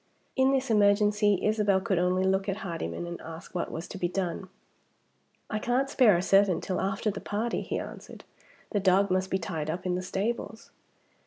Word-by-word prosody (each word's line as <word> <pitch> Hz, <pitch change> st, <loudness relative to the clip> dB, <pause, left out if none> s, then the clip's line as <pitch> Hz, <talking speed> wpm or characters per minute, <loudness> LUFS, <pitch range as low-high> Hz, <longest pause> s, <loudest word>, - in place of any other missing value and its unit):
In 265 Hz, 0 st, +4 dB
this 265 Hz, -2 st, 0 dB
emergency, 205 Hz, -1 st, +3 dB
Isabel 210 Hz, -2 st, +2 dB
could 190 Hz, -1 st, 0 dB
only 180 Hz, +1 st, +2 dB
look 190 Hz, +1 st, +1 dB
at 195 Hz, +3 st, -3 dB
Hardyman 165 Hz, -, -4 dB
and 170 Hz, 0 st, -7 dB
ask 165 Hz, +1 st, -10 dB
what 180 Hz, -, -3 dB
was 165 Hz, +2 st, -5 dB
to 195 Hz, -, -7 dB
be 175 Hz, -, +1 dB
done. 185 Hz, 0 st, -3 dB, 1.0 s
"I 215 Hz, -, -2 dB
can't 255 Hz, +5 st, 0 dB
spare 220 Hz, -9 st, +5 dB
a 175 Hz, -, -1 dB
servant 195 Hz, -2 st, +3 dB
till 185 Hz, -, -2 dB
after 195 Hz, +3 st, -1 dB
the 200 Hz, -, -7 dB
party," 220 Hz, +3 st, -2 dB
he -, -, -3 dB
answered. -, -, -8 dB, 0.5 s
"The 205 Hz, -, +1 dB
dog 190 Hz, 0 st, +3 dB
must 185 Hz, +1 st, +1 dB
be 190 Hz, -, +1 dB
tied 160 Hz, -4 st, -4 dB
up 175 Hz, +3 st, -4 dB
in 180 Hz, -, 0 dB
the 180 Hz, -, -1 dB
stables." 220 Hz, +4 st, -4 dB
195 Hz, 190 wpm, -28 LUFS, 180-210 Hz, 1.0 s, spare